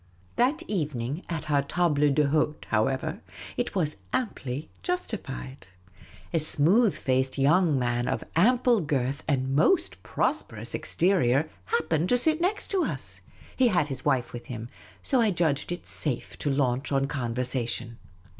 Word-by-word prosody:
That 280 Hz, +7 st, +2 dB
evening 145 Hz, -, -2 dB
at 155 Hz, -2 st, -4 dB
our 145 Hz, -1 st, +4 dB
table 170 Hz, +4 st, +1 dB, 0.2 s
d^lidtc, 150 Hz, +1 st, +1 dB
however, 135 Hz, -, 0 dB, 0.3 s
it 245 Hz, -3 st, -2 dB
was 155 Hz, -5 st, 0 dB
amply 145 Hz, -, -3 dB
justified. 195 Hz, -, -5 dB, 0.7 s
A 165 Hz, -, +3 dB
smooth 175 Hz, +9 st, +4 dB
faced 130 Hz, 0 st, 0 dB
young 155 Hz, +2 st, +4 dB
man 120 Hz, -1 st, 0 dB
of -, -, -1 dB
ample 240 Hz, +5 st, +4 dB
girth 140 Hz, -2 st, -1 dB
and 135 Hz, -2 st, 0 dB
most 340 Hz, -, +2 dB
prosperous -, -, -2 dB
exterior 155 Hz, -5 st, +2 dB
happened 160 Hz, -, 0 dB
to 245 Hz, -, +4 dB
sit 315 Hz, +6 st, +2 dB
next 400 Hz, +3 st, 0 dB
us. 375 Hz, -3 st, -2 dB, 0.3 s
He 260 Hz, -, +4 dB
had 175 Hz, -9 st, +2 dB
his 135 Hz, -2 st, -5 dB
wife 130 Hz, -5 st, +1 dB
with 120 Hz, 0 st, -8 dB
him, 115 Hz, -1 st, -6 dB, 0.3 s
so 260 Hz, -3 st, +3 dB
I 225 Hz, -, +3 dB
judged 165 Hz, -5 st, 0 dB
it 175 Hz, -, -5 dB
safe 135 Hz, -6 st, -2 dB
to 145 Hz, -, -1 dB
launch 135 Hz, -1 st, 0 dB
on 135 Hz, -1 st, +2 dB
conversa 125 Hz, -2 st, -2 dB
tion. 120 Hz, 0 st, -4 dB
150 Hz, 145 wpm, -27 LUFS, 130-185 Hz, 0.7 s, our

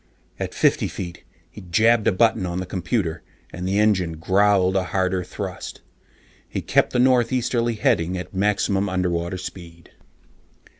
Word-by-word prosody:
At -, -, -4 dB
fifty -, -, +2 dB
feet, 85 Hz, -1 st, -7 dB, 0.3 s
he 105 Hz, -, -11 dB
jabbed 110 Hz, +6 st, +3 dB
a -, -, +5 dB
button 110 Hz, +1 st, +2 dB
on 85 Hz, 0 st, -3 dB
the 95 Hz, -, -3 dB
computer, 90 Hz, -2 st, -2 dB, 0.3 s
and 90 Hz, +1 st, -4 dB
the 95 Hz, +2 st, 0 dB
engines 95 Hz, -6 st, +2 dB
growled 95 Hz, +2 st, +3 dB
a 95 Hz, -1 st, +1 dB
harder 95 Hz, +1 st, 0 dB
thrust. 95 Hz, 0 st, -7 dB, 0.7 s
He -, -, -4 dB
kept -, -, +2 dB
the -, -, -1 dB
northeasterly 125 Hz, -1 st, +2 dB
heading 90 Hz, -3 st, +1 dB
at 90 Hz, +1 st, -7 dB
maximum 100 Hz, 0 st, +1 dB
underwater 90 Hz, -1 st, -1 dB
speed. 85 Hz, -2 st, -10 dB
95 Hz, 145 wpm, -23 LUFS, 90-105 Hz, 0.7 s, a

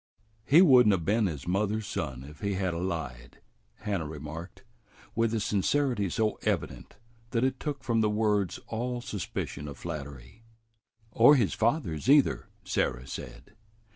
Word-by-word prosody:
"He 160 Hz, +8 st, +7 dB
would 130 Hz, -, +7 dB
n't 105 Hz, -, +5 dB
'a' -, -, +3 dB
been 105 Hz, +5 st, +1 dB
his 75 Hz, -5 st, -6 dB
mother's 105 Hz, +3 st, 0 dB
son 65 Hz, -8 st, -4 dB
if 75 Hz, +2 st, -12 dB
he 100 Hz, -2 st, -1 dB
had 95 Hz, -2 st, -1 dB
'a' 85 Hz, -, -3 dB
lied," 65 Hz, -10 st, -5 dB, 0.4 s
Hannah 100 Hz, -7 st, -2 dB
remarked, 80 Hz, -, -8 dB, 0.5 s
with 115 Hz, -1 st, +1 dB
a 115 Hz, -, 0 dB
sincerity 105 Hz, +1 st, +1 dB
so 110 Hz, +4 st, 0 dB
evident -, -, -3 dB, 0.3 s
that 115 Hz, -1 st, 0 dB
it 130 Hz, 0 st, 0 dB
took 145 Hz, -3 st, -4 dB
from 115 Hz, -2 st, +1 dB
the 105 Hz, -, +2 dB
words 105 Hz, -3 st, 0 dB
all 120 Hz, +2 st, -3 dB
suspicion 95 Hz, -, -5 dB
of 70 Hz, -3 st, -8 dB
flattery. 70 Hz, -, -8 dB, 0.7 s
"Or 120 Hz, +7 st, +7 dB
his 115 Hz, -8 st, +2 dB
father's 115 Hz, -, 0 dB
either," 145 Hz, -4 st, +4 dB, 0.2 s
Sarah 65 Hz, -9 st, -1 dB
said. 65 Hz, -, -9 dB
100 Hz, 155 wpm, -29 LUFS, 80-115 Hz, 0.7 s, He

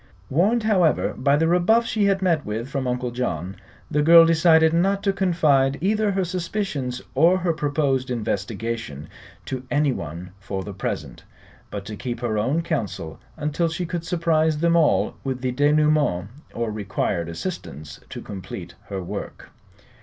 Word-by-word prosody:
Warned, 205 Hz, -, +2 dB
however, 185 Hz, -7 st, +2 dB
by 140 Hz, +2 st, +2 dB
the 160 Hz, +2 st, +2 dB
rebuff 180 Hz, +7 st, +3 dB
she 215 Hz, -3 st, +1 dB
had 195 Hz, -1 st, +2 dB
met 165 Hz, -5 st, +2 dB
with 110 Hz, +3 st, -4 dB
from 135 Hz, -1 st, -3 dB
Uncle 125 Hz, 0 st, -2 dB
John, 95 Hz, -7 st, -3 dB, 0.4 s
the 150 Hz, -, +2 dB
girl 165 Hz, +2 st, +8 dB
decided 160 Hz, -1 st, +5 dB
not 195 Hz, +4 st, +2 dB
to 200 Hz, -1 st, +2 dB
confide 155 Hz, -8 st, +2 dB
either 210 Hz, +4 st, +1 dB
her 190 Hz, -1 st, 0 dB
suspicions 170 Hz, -8 st, -3 dB
or 165 Hz, +7 st, +5 dB
her 175 Hz, -2 st, 0 dB
proposed 145 Hz, -4 st, 0 dB
investigation 110 Hz, -, -3 dB, 0.4 s
to 130 Hz, -2 st, -4 dB
anyone 90 Hz, -, -1 dB
for 95 Hz, 0 st, -5 dB
the 100 Hz, -, -7 dB
present, 95 Hz, -, -5 dB, 0.5 s
but 100 Hz, -2 st, -6 dB
to 105 Hz, -, -6 dB
keep 120 Hz, +1 st, -5 dB
her 110 Hz, -3 st, 0 dB
own 140 Hz, +10 st, 0 dB
counsel 100 Hz, -, -3 dB, 0.2 s
until 150 Hz, +3 st, 0 dB
she 160 Hz, +2 st, -3 dB
could 170 Hz, -1 st, -4 dB
surprise 160 Hz, -2 st, +1 dB
them 170 Hz, +2 st, +2 dB
all 165 Hz, -3 st, +3 dB
with 130 Hz, -2 st, -3 dB
the 130 Hz, -1 st, -1 dB
denouement 145 Hz, -8 st, +2 dB, 0.2 s
or 115 Hz, -2 st, -3 dB
required 95 Hz, -4 st, -2 dB
assistance 75 Hz, -3 st, -6 dB
to -, -, -7 dB
complete 95 Hz, -3 st, -8 dB, 0.2 s
her 95 Hz, -2 st, -4 dB
work. -, -, -7 dB
145 Hz, 155 wpm, -23 LUFS, 110-170 Hz, 0.5 s, girl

